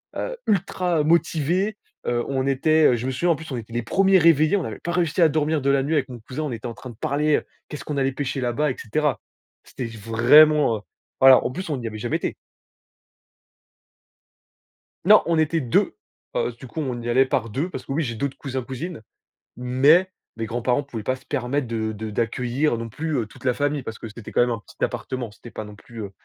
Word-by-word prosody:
heu, - - -3
ultra 180 -4 +1
motivés, 170 +5 +1 0.3
heu, 120 -1 +1
on 135 -1 0
était, 145 0 +4
je 120 - -4
me 130 - -1
souviens, 170 +7 0
en - - +3
plus, 160 0 -10
on 130 - -2
était 115 0 -8
les 120 - -1
1ers 195 - +4
réveillés, 160 +1 +4
on 185 - -2
avait - - -6
pas 170 - -4
réussi 175 0 +1
à 165 - +7
dormir 155 0 0
de 140 - +1
la 140 -1 +3
nuit 150 +4 -1
avec 135 -3 0
mon 120 -2 -8
cousin, 130 +7 -5
on 150 - -3
était 115 0 -5
en 115 - -5
train 130 - -10
de 120 - -11
parler, 150 +4 +1
heu, - - -5 0.2
qu'est-ce 150 - -7
qu'on 150 - -3
allait 135 -1 +1
pêcher 135 -1 -3
là-bas 130 +4 0
et - - -5
cetera. 150 +6 -1 0.4
C'était 125 - -6
j 115 - -10
vraiment, 120 +4 +5
heu, - - -10 0.4
voilà, 130 -1 +8
en - - +1
plus 180 +4 -6
on 140 - -1
y 115 - -4
avait 110 - -6
jamais - - -1
été! - - -3 2.7
Non, 210 +2 +7
on 165 -1 +2
était 160 +1 +1
2, 120 -3 +1 0.4
heu, - - 0
du 130 - -9
coup 160 - -7
on 125 -4 -3
y 120 - -4
allait 130 +3 +4
par 120 -3 -1
2, 140 - -2
parce - - -7
que - - -7
oui 160 +4 0
j'ai 120 -4 -3
d'autres 140 +4 -3
cousins, 130 -2 -4
cousines, 135 +5 -6 0.5
mais 140 +9 +4 0.2
mes 115 0 -3
grands-parents 120 +4 0
pouvaient 120 -6 -7
pas 130 - 0
se 130 - -18
permettre 135 0 -1
de 110 -1 -2
de 110 +1 -6
d'accueillir 120 +4 0
non 115 0 -5
plus, 155 +7 -3
heu, 115 - 0
toute 110 - -16
la 125 - +3
famille, 145 +1 -1
parce 110 - -6
que 115 - -8
c'était 105 +1 -10
quand - - +4
même 125 - +3
un 115 -3 -2
petit - - -9
appartement, 125 -4 -3
c'était 115 +3 -13
pas 110 - -6
non 105 0 -11
plus, 115 +2 -10
heu, 100 - -7
135 Hz, 235 wpm, -23 LUFS, 120-155 Hz, 2.7 s, voilà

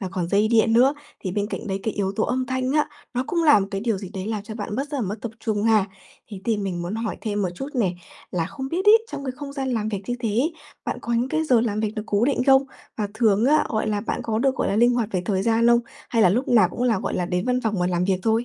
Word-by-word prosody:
và 190 - -3
còn 180 -3 -2
dây 205 +3 +3
điện 225 -1 +3
nữa, 255 +5 +5 0.3
thì 185 - -4
bên 205 +1 -1
cạnh - - -6
đấy 195 -1 -2
cái 220 - -2
yếu 195 -1 -1
tố 220 - +2
âm 255 +1 -1
thanh 260 0 -1
á, 300 0 +2 0.3
nó 250 +1 0
cũng 340 -1 0
là 295 -9 +6
một 195 - -2
cái 195 -1 -3
điều 225 -2 0
gì 190 -1 -7
đấy 190 0 -4
làm 215 -2 -2
cho 215 +1 -8
bạn 210 -1 -5
mất 275 +2 -2
rất 290 - -2
là - - -1
mất 205 -2 -2
tập 235 - -4
trung 210 -2 -1
ha. 215 -3 +3 0.4
Thế 195 -3 -7
thì 225 -2 +1
mình 190 -4 -3
muốn 175 +4 -4
hỏi 225 -1 -3
thêm 210 -2 -2
một 185 - 0
chút 270 +10 -5
nè, 210 -8 +1 0.4
là 170 -2 -1
không 265 - -6
biết 355 +6 -2
ấy, 445 +2 +7
trong 280 - -5
cái 260 - -3
không 285 -1 -7
gian 270 -2 -3
làm 215 -2 -1
việc 205 -2 -3
như 245 - -1
thế 230 - -1
ấy, 250 +11 +1 0.3
bạn - - -3
có 235 - -3
những 240 +3 +1
cái 315 +3 0
giờ 250 -6 +4
làm 215 -2 -1
việc 215 -1 0
được 215 - -3
cố 205 +2 +2
định 265 -1 +1
không? 270 0 +6 0.3
Và 210 -2 -2
thường 220 -1 +3
á, 300 +4 +4
gọi 220 -1 -1
là, 210 -1 0
bạn 215 - -3
có 220 -1 -1
được, 265 +2 +2
gọi - - -1
là, 200 - 0
linh 240 +2 +5
hoạt 235 -3 0
về 185 - 0
thời 190 0 0
gian 230 +2 +2
không? 235 0 +5 0.3
Hay 230 -2 +2
là 185 - +6
lúc 240 +9 0
nào 235 -3 +5
cũng 245 - -5
là, 235 -5 +2
gọi - - -3
là, 180 - -1
đến 180 +1 -1
văn 250 0 +1
phòng 220 -3 -1
và 180 - +2
làm 180 0 0
việc 190 -1 +1
thôi? 225 +2 +2
225 Hz, 315 wpm, -23 LUFS, 200-250 Hz, 0.4 s, ấy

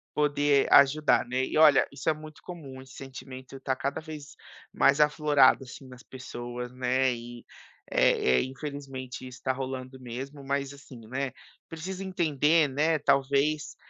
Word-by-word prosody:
poder 145 -1 +2
ajudar, 145 +1 +5
né. 130 +2 -1
E, - - -3
olha, 150 -3 +6
isso 145 - -2
é - - +3
muito 155 0 -12
comum, 140 -7 -9
esse 130 0 -15
sentimento 130 0 -10
está 135 0 -2
cada 140 +3 -3
vez 155 -2 -10 0.4
mais 140 +1 +4
aflorado, 150 -3 +4
assim, 130 +1 -11
nas 125 0 -13
pessoas, 125 -1 -7
né, 130 0 +1
e, 120 0 -9 0.5
eh 65 0 +3
eh, - - 0
infelizmente 135 -2 -7
isso 125 -1 -12
tá 130 - +1
rolando 130 0 -6
mesmo 135 +4 -7
mas, 140 0 -2
assim, 140 -3 -13
né, 130 +2 -3 0.4
precisa 185 +4 -6
entender, 160 -4 +2
né, 155 +4 +1
talvez, 140 +2 +1
135 Hz, 150 wpm, -28 LUFS, 130-150 Hz, 0.5 s, olha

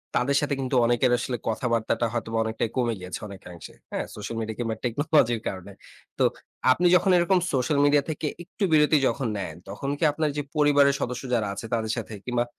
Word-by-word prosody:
তাদের 135 +3 +2
সাথে 145 -1 -1
কিন্তু 130 0 -2
অনেকের 120 +1 +2
আসলে 125 -1 -3
কথাবার্তাটা 115 0 0
হয়তো 115 -1 -3
অনেকটাই 110 0 -2
কমে 120 -2 +1
গিয়েছে 90 0 -6
অনেকাংশে, 90 -4 -11 0.2
হ্যাঁ? - - -2
সোশ্যাল 105 +2 -6
মিডিয়া 110 -1 -4
কিংবা 115 -2 -1
টেকনোলজির 120 -2 +2
কারণে। 95 +1 -6 0.5
তো - - +4 0.5
আপনি 175 +7 +2
যখন 190 +1 +3
এরকম 180 +2 +3
সোশ্যাল 135 +3 +1
মিডিয়া 145 -1 +4
থেকে 155 0 -2 0.2
একটু 195 +4 -6
বিরতি 150 0 +5
যখন 135 -4 -1
নেন, 100 - -5
তখন 135 +8 -4
কি - - -4
আপনার 155 0 -1
যে - - +1
পরিবারের 145 -2 +4
সদস্য 125 +1 -3
যারা 110 -4 +1
আছে, 100 - -7
তাদের 110 -1 0
সাথে 115 -1 -5
কিংবা 120 -1 +1
125 Hz, 185 wpm, -25 LUFS, 110-145 Hz, 0.5 s, বিরতি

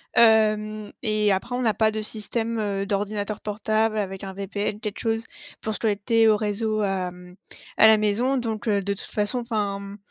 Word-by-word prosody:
Hem 215 -2 +3
et 215 -2 +3
après 195 +6 -1
on 250 - -1
n'a 220 -2 +3
pas 220 -1 +3
de 215 0 -3
système, 225 +2 -2
heu, 200 -2 -1
d'ordinateur 205 +1 -2
portable 215 +1 0
avec 195 -2 -3
un 190 -1 -6
VPN 200 +1 -3
quelque 215 -2 -5
chose 225 -1 0 0.4
pour 220 - -2
se - - -3
connecter 225 +1 +2
au 215 -1 +5
réseau 215 +1 -1
à, 195 -2 0
hem, 180 0 -14 0.4
à 220 - +8
la 220 0 +7
maison 220 +6 +1
donc, 225 -3 -3
heu, 200 -2 +2
de 200 +1 -1
toute 200 - -6
façon 210 +4 +1
enfin, 215 -4 -2
hem, 200 0 -9
215 Hz, 195 wpm, -24 LUFS, 200-220 Hz, 0.4 s, à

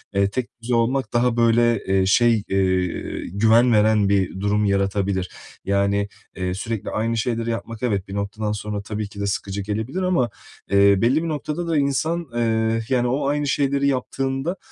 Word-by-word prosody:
eee, 100 0 +3
tekdüze 120 +1 -3
olmak 115 +1 0
daha 120 0 +2
böyle, 115 -1 +3
eee, 95 0 +2
şey, 115 +1 +3
eee, 95 -2 -1
güven 115 +5 +4
veren 105 -1 +3
bir 95 -1 0
durum 105 +1 +1
yaratabilir. 100 -1 0 0.4
Yani, 100 +1 +1 0.3
eee, 90 -1 -2
sürekli 110 +1 -4
aynı 115 +1 -1
şeyleri 115 0 -1
yapmak 115 0 -5
evet, 100 -6 -1
bir 95 - -8
noktadan 105 +1 -3
sonra 105 0 -4
tabii 105 0 -5
ki 100 - -11
de 100 - -1
sıkıcı 100 0 -3
gelebilir 110 - -3
ama, 180 -10 +1 0.4
eee, 100 0 +6
belli 130 +8 +2
bir 170 - -2
noktada 155 +3 -3
da 165 -2 +1
insan, 155 +4 0
eee, 115 -1 +1
yani, 125 -2 +2
o 135 +3 0
aynı 145 0 0
şeyleri 140 0 +1
yaptığında, 135 +5 -2
110 Hz, 165 wpm, -22 LUFS, 100-125 Hz, 0.4 s, eee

